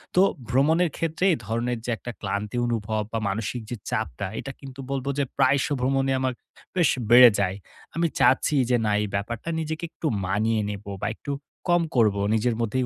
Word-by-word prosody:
তো 180 - +6 0.3
ভ্রমণের 160 +7 +3
ক্ষেত্রে 165 +2 -1
এই - - -1
ধরনের 120 +2 -1
যে - - -4
একটা 120 - -7
ক্লান্তি 100 +3 -3
অনুভব, 110 -2 -1
বা 115 - -1
মানসিক 110 +4 -3
যে 120 - -3
চাপটা, - - -2
এটা 135 - -5
কিন্তু 135 -1 -11
বলব 135 -1 -2
যে - - +3
প্রায়শ 135 +1 +3
ভ্রমণে 135 +1 +1
আমার 130 -1 0 0.4
বেশ 175 -5 +4 0.2
বেড়ে 120 +1 +10
যায়। 95 -1 +1 0.4
আমি 170 0 +2
চাচ্ছি, 130 +4 +4
যে 125 - +4
না 105 - +1
এই 105 - -1
ব্যাপারটা 115 +9 -3
নিজেকে 160 +1 -4
একটু 160 - -4 0.2
মানিয়ে 110 +4 +1
নেব, 105 0 -6 0.2
বা - - +1
একটু 145 - -6 0.4
কম 175 0 +4
করব। 110 -4 +4 0.2
নিজের 110 +1 +1
মধ্যে 115 +2 -1
এই - - 0
125 Hz, 185 wpm, -25 LUFS, 110-140 Hz, 0.4 s, বেড়ে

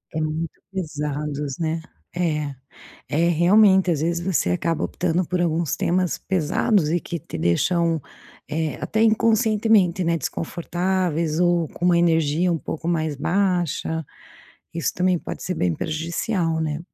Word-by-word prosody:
É, 160 - 0
muito 155 +1 -3
pesados, 150 -5 -3
né. 160 0 -1 0.3
É, 150 -5 -1 0.5
é, 165 +3 +2
realmente, 190 +3 +5
às 155 -4 0
vezes 170 +2 0
você 175 - 0
acaba 165 - 0
optando 180 +1 0
por 180 +2 -2
alguns 165 -2 0
temas 180 0 0
pesados 185 0 +1
e 175 - +2
que 170 - -5
te 140 - -8
deixam, 165 - +1 0.5
eh, 155 -2 -1
até 220 - -1
inconscientemente, 220 -4 +3
né, 170 0 +1
desconfortáveis 170 +1 -1
ou 175 -2 +2
com 175 - -6
uma 175 -1 +5
energia 165 0 +2
um 165 - 0
pouco 160 +3 -5
mais 160 -3 0
baixa, 175 -1 0 0.7
isso 165 -6 -1
também 180 -1 +1
pode - - -7
ser 185 - -2
bem 90 - +1
prejudicial, 165 +2 -1
né? 155 -1 -2
170 Hz, 140 wpm, -23 LUFS, 155-180 Hz, 0.7 s, realmente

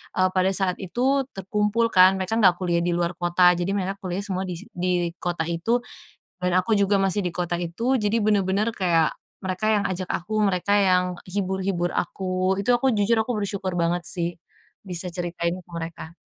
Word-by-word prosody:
eee, 185 0 +3
pada 185 0 +2
saat 185 -2 +1
itu 260 +8 0
terkumpul 210 +4 0
kan, 185 -1 +6
mereka 190 +4 -1
enggak 190 -6 +5
kuliah 175 -2 +1
di 175 +1 0
luar 175 0 -1
kota, 175 +1 +4
jadi 180 +3 -1
mereka 195 0 -2
kuliah 185 +1 -3
semua 190 -2 -2
di 180 - -4
si 165 - -11
di 175 -1 -1
kota 175 -2 -2
itu 225 +9 0 0.6
dan 180 0 +2
aku 220 +4 0
juga 200 0 +3
masih 195 +1 +1
di 180 - -1
kota 175 0 -2
itu. 200 +10 -1
Jadi 210 +2 +1
benar-benar 205 +1 +1
kayak 170 -4 +2 0.2
mereka 190 +2 -2
yang 210 -2 +2
ajak 185 0 -3
aku, 215 +5 -1
mereka 200 0 +1
yang 180 -1 +2 0.2
hibur-hibur 190 -2 -1
aku. 185 +1 -1
Itu 245 +5 +2
aku 255 +2 +2
jujur, 220 +2 +3
aku 225 0 -2
bersyukur 195 -2 -3
banget 170 +1 +1
sih 170 -1 -1 0.5
bisa 180 -2 -3
ceritain 170 -1 -2
ke 175 - -31
mereka. 165 0 -7
185 Hz, 185 wpm, -24 LUFS, 175-205 Hz, 0.6 s, kan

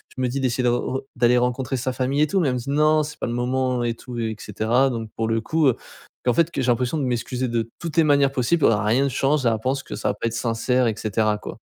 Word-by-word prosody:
je 130 - -4
me 125 - +1
dis 135 +3 -2
d'essayer 130 -1 0
de - - +4
re 125 +2 -1
d'aller 125 0 +3
rencontrer 125 +2 -1
sa 130 +1 -2
famille 135 +3 0
et 155 - +4
tout 195 - +1
mais 145 - +2
elle - - 0
me - - -2
dit: 125 - -7
«Non 155 +2 +3
c'est 150 0 -6
pas - - -3
le 120 - -3
moment» 125 0 0
et 115 -1 -1
tout 120 0 -8
et 110 -1 -2
cetera. 115 +6 +1
Donc 115 -2 -5
pour 110 0 -1
le 115 0 0
coup 155 +5 +1
heu, 125 - +3 0.5
et - - +6
en - - +3
fait 170 +4 +2
que 135 - -2
j'ai 130 - -1
l'impression 125 +5 0
de 145 - -1
m'excuser 125 +1 -2
de 115 -1 -2
toutes 165 -2 -5
les 165 - +6
manières 140 -2 +3
possibles, 140 +5 +2
heu, 115 - +5
rien 110 +6 +2
ne - - +1
change 135 +1 +1
et - - +5
elle 110 -1 0
pense 135 +1 0
que - - -7
ça - - -1
va - - 0
pas 115 - -2
être 115 - -3
sincère 115 +2 0
et 110 - +1
cetera 110 0 0
quoi. - - -8
125 Hz, 300 wpm, -23 LUFS, 115-135 Hz, 0.5 s, et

